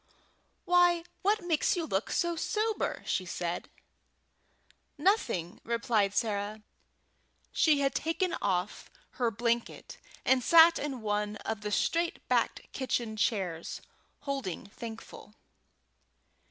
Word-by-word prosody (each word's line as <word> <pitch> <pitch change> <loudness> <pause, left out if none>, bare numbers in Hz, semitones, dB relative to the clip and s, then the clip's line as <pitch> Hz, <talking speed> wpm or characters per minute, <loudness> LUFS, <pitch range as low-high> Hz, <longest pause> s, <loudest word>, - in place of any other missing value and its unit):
"Why, 350 -1 +4 0.2
what 410 +1 +2
makes 335 0 +2
you 335 - -1
look 195 -7 -1
so 345 0 0
sober?" 430 +5 -1
said 180 -2 -2
she. - - -30 1.2
"Nothing," 285 - 0
replied 225 -3 +1
Sarah. 210 -1 -1 0.9
She 300 -4 +3
had 275 -1 +1
taken 335 +3 -1
off 190 0 -1 0.3
her 240 -2 +3
blanket, 235 +2 -2 0.3
and 260 -1 +4
sat 330 +2 +7
in 275 -5 -4
one 210 0 -1
of 220 -2 -3
the 210 - -3
straight 335 +10 0
backed - - 0
kitchen 235 -4 -2
chairs, 185 -7 -1 0.4
holding 275 - -4
Thankful. 220 0 -10
235 Hz, 110 wpm, -30 LUFS, 205-330 Hz, 1.2 s, sat